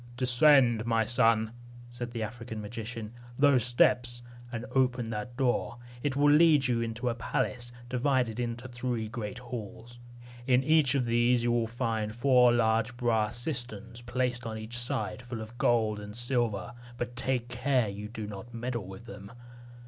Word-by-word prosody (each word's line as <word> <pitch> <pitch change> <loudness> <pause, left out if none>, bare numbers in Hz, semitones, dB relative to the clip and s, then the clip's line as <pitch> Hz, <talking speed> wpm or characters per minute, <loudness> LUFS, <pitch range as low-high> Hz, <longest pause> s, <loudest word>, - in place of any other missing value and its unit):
"Descend, 125 -2 +5
my 115 -1 +2
son," 115 -1 +3 0.4
said 120 0 -5
the 115 -2 -4
African 115 0 -6
magician, 110 +1 -6 0.2
"those 140 -4 +4
steps, 120 0 +2 0.3
and 115 0 -4
open 125 -3 +1
that 115 +3 -5
door. 125 -2 0 0.2
It 140 -1 -1
will 145 +1 +4
lead 150 -3 +5
you 120 -2 +1
into 115 +2 -3
a 120 - +2
palace, 120 +1 -2 0.2
divided 125 -2 0
into 120 +1 -3
three 120 -2 -3
great 115 +1 -5
halls. 120 -1 -8 0.5
In 130 0 +4
each 155 -2 +4
of 130 -3 +1
these 120 +1 +3
you 120 - +2
will 120 -1 +1
see 115 -2 -2
four 125 -1 +5
large 115 0 +1
brass 115 -3 +1
cisterns 120 -4 -5
placed 125 0 -2
on 110 -1 -4
each 110 +2 -5
side, 110 -2 -2
full 120 -1 -6
of 110 +2 -8
gold 110 -3 +2
and 105 0 -9
silver; 120 -3 0 0.2
but 120 0 -4
take 130 -1 -1
care 125 -1 +1
you 105 +1 -6
do 110 -1 -6
not 105 +3 -9
meddle 120 -4 -3
with 95 +5 -10
them. 100 -2 -10
120 Hz, 165 wpm, -29 LUFS, 115-125 Hz, 0.5 s, Descend